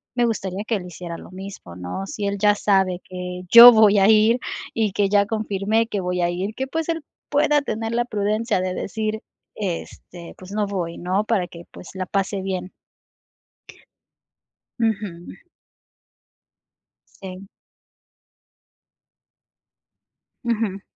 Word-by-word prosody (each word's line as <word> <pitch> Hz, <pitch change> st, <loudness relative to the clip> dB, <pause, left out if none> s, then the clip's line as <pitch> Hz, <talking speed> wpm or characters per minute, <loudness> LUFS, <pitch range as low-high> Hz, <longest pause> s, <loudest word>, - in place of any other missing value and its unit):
me 245 Hz, -1 st, +2 dB
gustaría 200 Hz, -4 st, -3 dB
que 230 Hz, -, +1 dB
él 190 Hz, -4 st, -4 dB
hiciera 170 Hz, -1 st, -7 dB
lo -, -, -13 dB
mismo, 185 Hz, -, -9 dB
¿no? 90 Hz, -, -5 dB
Si 205 Hz, +1 st, -5 dB
él 200 Hz, 0 st, -2 dB
ya 205 Hz, +1 st, +4 dB
sabe 190 Hz, -3 st, +1 dB
que 180 Hz, 0 st, -6 dB
yo 235 Hz, +3 st, +12 dB
voy 215 Hz, -2 st, +5 dB
a 195 Hz, +2 st, +5 dB
ir 220 Hz, +2 st, +5 dB, 0.3 s
y 220 Hz, -3 st, 0 dB
que 200 Hz, +1 st, +1 dB
ya 200 Hz, 0 st, +4 dB
confirmé 215 Hz, +1 st, 0 dB
que 205 Hz, -3 st, -3 dB
voy 180 Hz, 0 st, -2 dB
a 175 Hz, -, +2 dB
ir, 185 Hz, +5 st, -3 dB
que, 265 Hz, +4 st, -4 dB
pues, 320 Hz, +4 st, -3 dB
él 330 Hz, -1 st, -1 dB, 0.3 s
pueda 295 Hz, 0 st, +3 dB
tener 225 Hz, -4 st, -3 dB
la 240 Hz, +1 st, +2 dB
prudencia 215 Hz, -1 st, -1 dB
de 185 Hz, 0 st, -2 dB
decir, 215 Hz, +3 st, -3 dB, 0.3 s
este, 175 Hz, -2 st, -6 dB
pues, 185 Hz, +1 st, -12 dB
no 210 Hz, 0 st, -1 dB
voy, 175 Hz, -4 st, -4 dB
¿no? 185 Hz, +4 st, 0 dB
Para 210 Hz, -5 st, 0 dB
que, 170 Hz, 0 st, -12 dB
pues, -, -, -11 dB
la 190 Hz, -1 st, -4 dB
pase 195 Hz, 0 st, -1 dB
bien. 185 Hz, -1 st, -4 dB, 2.1 s
Ujú. 205 Hz, -7 st, -2 dB, 1.9 s
Sí. 190 Hz, 0 st, -9 dB, 3.0 s
Ujú. 220 Hz, -5 st, -1 dB
200 Hz, 135 wpm, -22 LUFS, 185-220 Hz, 3.0 s, yo